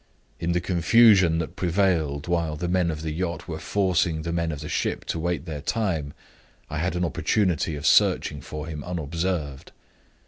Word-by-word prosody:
In 85 +1 -1
the 90 - +1
confusion 95 0 +5
that 80 -1 -4
prevailed 85 -6 0
while 85 -3 0
the 85 +4 -3
men 90 -1 +1
of 80 -1 -4
the 80 - -2
yacht 85 -1 -3
were - - -5
forcing 90 -5 0
the 85 - -3
men 85 -1 0
of 75 -1 -6
the 75 - -6
ship - - -2
to - - -3
wait 85 -1 -2
their 75 -4 -5
time, 85 -9 -1 0.6
I 75 - -2
had 90 +1 -1
an 90 0 0
opportunity 85 -1 0
of 75 - -6
searching 70 - +3
for 75 +2 -6
him 75 -2 -6
unobserved. 85 -3 -3
85 Hz, 180 wpm, -25 LUFS, 75-90 Hz, 0.6 s, confusion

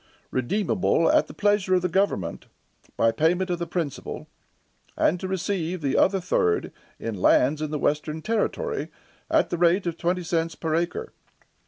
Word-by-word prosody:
redeemable 165 - +1
at - - +3
the - - -10
pleasure 205 -2 +2
of 180 - +1
the - - +2
government, 195 +4 -1 0.5
by 115 - +4
payment 175 +8 +1
of 175 - -1
the 170 - -3
principal, 165 -5 -4 0.7
and 180 - +2
to 190 - -4
receive 185 -2 -2
the 140 -3 -1
other 195 0 +3
third 90 - 0 0.3
in 115 - -4
lands 130 +9 +3
in 155 - -2
the 150 - -2
western 150 +2 -1
territory, 410 - -1 0.4
at 320 -1 +2
the 175 - -2
rate 175 +3 +3
of 170 -1 -2
twenty 180 +1 -1
cents 165 -1 -1
per 160 -2 -3
acre. 175 - -2
175 Hz, 165 wpm, -25 LUFS, 155-190 Hz, 0.7 s, by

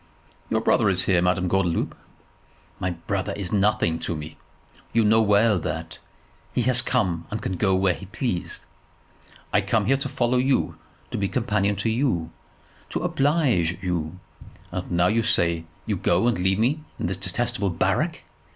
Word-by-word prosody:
"Your 110 - +1
brother 110 -2 +3
is 95 -1 +2
here, 90 -3 +3
Madame 90 0 +1
Gordeloup." 90 -2 0 0.9
"My 90 - -1 0.2
brother 100 -2 -1
is 100 -3 -5
nothing 100 -5 +2
to 85 - -3
me. 75 0 -7 0.6
You 115 -1 +3
know 110 +1 +5
well 105 -1 +4
that. 80 +1 -5 0.5
He 125 - +1
can 130 +2 +2
come 85 -4 0
and 110 - -3
he - - -12
can 95 - -2
go 95 +1 +2
when 95 -1 +2
he 95 - -10
please. 105 -3 -3 0.9
I - - +4
come - - +1
here 135 +2 +3
to 140 0 -3
follow 125 -1 +1
you, 130 +1 +1 0.4
to - - -2
be 100 - +1
companion 105 -4 0
to 105 +4 -1
you, 110 - 0 0.6
to - - -3
oblige 135 - +1
you, 90 -2 -2 0.5
and - - -4
now 85 0 +3
you 110 +5 +3
say 85 -7 +1 0.2
you - - -1
go 90 +6 +2
and 120 - +1
leave 95 +1 +2
me 135 +8 +1
in - - -3
this 90 +2 -1
detestable 105 +3 -1
barrack. 85 - 0
100 Hz, 170 wpm, -24 LUFS, 90-115 Hz, 0.9 s, know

